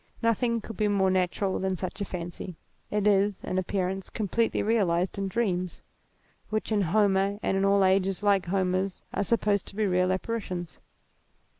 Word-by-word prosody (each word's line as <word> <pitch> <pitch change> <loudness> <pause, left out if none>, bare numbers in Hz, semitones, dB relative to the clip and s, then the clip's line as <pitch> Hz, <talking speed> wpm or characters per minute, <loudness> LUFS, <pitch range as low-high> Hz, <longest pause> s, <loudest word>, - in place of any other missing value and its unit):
Nothing 230 0 +1
could 225 -3 -9
be 210 - +2
more 195 -2 +2
natural 185 +1 0
than 190 0 0
such 185 +3 -5
a - - 0
fancy; 175 0 -6 0.3
it 210 -1 0
is, 205 -1 +2
in 185 - -1
appearance, 190 0 -2
completely 225 +2 0
realized 190 -4 +1
in 195 - -1
dreams, 185 -4 -1 0.7
which 215 +1 -2
in 210 -2 +3
Homer 195 +1 +2
and - - +1
in 195 - +1
all 195 0 +4
ages 190 +1 +2
like 200 -3 +3
Homer's, 185 0 0
are - - 0
supposed 205 -2 +1
to - - -10
be 215 0 +1
real 185 -1 +2
apparitions. 185 -4 -3
195 Hz, 165 wpm, -27 LUFS, 185-210 Hz, 0.7 s, all